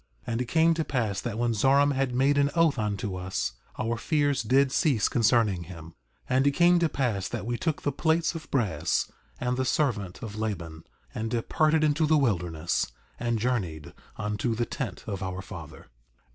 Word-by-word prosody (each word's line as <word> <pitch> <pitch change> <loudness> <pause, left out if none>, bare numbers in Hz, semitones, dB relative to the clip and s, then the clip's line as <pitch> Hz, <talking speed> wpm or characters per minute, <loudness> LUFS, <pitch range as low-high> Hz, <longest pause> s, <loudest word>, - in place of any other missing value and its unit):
4:37 - - -4
And 115 - -1
it - - -1
came 165 +6 +3
to 160 0 -1
pass 110 -9 -1
that 115 -3 -4
when 120 0 +1
Zoram 140 +6 +4
had 135 -2 -1
made 140 +3 +3
an 140 0 +3
oath 165 -6 +3
unto 105 -1 -2
us, 90 -9 -2 0.2
our 115 +1 -1
fears 145 +1 +1
did 130 +4 +3
cease 135 - +2
concerning 110 -6 +2
him. 85 -2 -10
4:38 - - -29 0.4
And 130 +2 +3
it - - +5
came 175 +2 +5
to 165 -2 +2
pass 115 -10 -1
that 90 - -4
we 120 +1 -1
took 155 +4 -2
the 145 - +1
plates 160 +4 +1
of 165 -2 -8
brass 105 - 0 0.3
and 125 0 -1
the 130 - +1
servant 120 - -1
of 105 -2 -6
Laban, 85 -7 -4 0.3
and 110 +1 -3
departed 155 +7 +2
into 155 +1 +2
the 155 0 +4
wilderness, 85 - 0 0.3
and 120 -1 0
journeyed 100 - -2 0.2
unto 105 +3 -1
the 120 +1 0
tent 115 -7 -5
of 100 -3 -4
our 95 0 -4
father. 85 -6 -10
120 Hz, 190 wpm, -27 LUFS, 100-140 Hz, 0.4 s, it